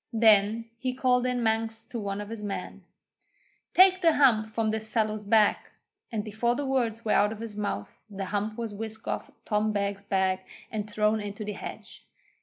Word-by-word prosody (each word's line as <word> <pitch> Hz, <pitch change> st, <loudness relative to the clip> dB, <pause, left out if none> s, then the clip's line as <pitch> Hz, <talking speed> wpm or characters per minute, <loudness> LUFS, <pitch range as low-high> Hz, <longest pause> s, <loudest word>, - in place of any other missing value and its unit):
Then 220 Hz, 0 st, +4 dB
he 255 Hz, 0 st, -2 dB
called 250 Hz, -1 st, +2 dB
in 250 Hz, -1 st, 0 dB
Manx 225 Hz, 0 st, 0 dB
to 235 Hz, 0 st, -6 dB
one 200 Hz, -1 st, -3 dB
of 205 Hz, -, -7 dB
his 225 Hz, -2 st, -6 dB
men: 205 Hz, -1 st, -5 dB, 0.9 s
'Take 370 Hz, 0 st, +7 dB
the 330 Hz, -2 st, +5 dB
hump 235 Hz, -7 st, +4 dB
from 220 Hz, 0 st, 0 dB
this 220 Hz, 0 st, -4 dB
fellow's 215 Hz, -1 st, 0 dB
back,' 210 Hz, 0 st, +3 dB, 0.4 s
and 215 Hz, -3 st, -2 dB
before 225 Hz, +3 st, 0 dB
the 285 Hz, -, -2 dB
words 235 Hz, -4 st, 0 dB
were 215 Hz, -, +1 dB
out 210 Hz, -, +4 dB
of 220 Hz, -, -7 dB
his 225 Hz, -2 st, -6 dB
mouth 205 Hz, -, -4 dB
the 195 Hz, -1 st, -5 dB
hump 210 Hz, +2 st, -2 dB
was 230 Hz, -3 st, -4 dB
whisked 220 Hz, +1 st, -7 dB
off -, -, -3 dB, 0.2 s
Tom 215 Hz, 0 st, +1 dB
Beg's 200 Hz, -1 st, -1 dB
back 190 Hz, -2 st, 0 dB, 0.2 s
and 215 Hz, -1 st, -3 dB
thrown 210 Hz, +1 st, +1 dB
into 205 Hz, +1 st, -5 dB
the 210 Hz, -, -3 dB
hedge. 200 Hz, -, -9 dB
220 Hz, 190 wpm, -28 LUFS, 205-230 Hz, 0.9 s, Take